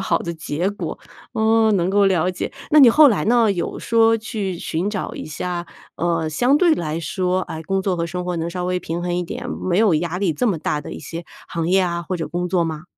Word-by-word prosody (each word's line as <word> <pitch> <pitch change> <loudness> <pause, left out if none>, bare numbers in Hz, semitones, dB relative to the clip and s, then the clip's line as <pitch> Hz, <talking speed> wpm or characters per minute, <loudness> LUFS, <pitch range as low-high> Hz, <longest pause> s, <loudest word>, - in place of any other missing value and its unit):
好 195 - +1
的 170 - -4
结 160 +3 -2
果。 205 - -5 0.3
哦， 220 0 +3
能 180 -3 +1
够 200 0 +4
了 185 -1 +2
解。 180 - -5 0.2
那 305 - +6
你 265 - +9
后 300 +3 +7
来 200 -10 +1
呢， 230 -1 +4
有 175 -4 -3
说 225 0 +3
去 210 -5 -4
寻 170 +5 -2
找 210 - -4
一 - - -6
下， 175 +3 -4 0.3
呃， 165 -2 0
相 245 - +2
对 335 -1 +4
来 160 -1 -3
说， 180 +3 -1
哎， 160 0 -6
工 195 +3 -1
作 185 -2 0
和 170 0 -1
生 180 +1 -4
活 180 -1 -2
能 165 +1 -2
稍 180 0 -4
微 180 0 0
平 170 0 -4
衡 175 0 -1
一 180 - 0
点， 245 +8 -6
没 185 +1 -1
有 215 -7 +4
压 170 +3 -1
力 190 -5 +1
这 245 +11 -1
么 185 -7 +1
大 150 0 -1
的 - - -8
一 - - -7
些 170 0 -7 0.2
行 165 -1 -2
业 190 +1 +4
啊 170 -1 -1
或 185 +2 -3
者 160 -3 -4
工 175 +2 -2
作 180 -2 +2
吗？ 160 0 -5
180 Hz, 265 characters per minute, -21 LUFS, 170-205 Hz, 0.3 s, 你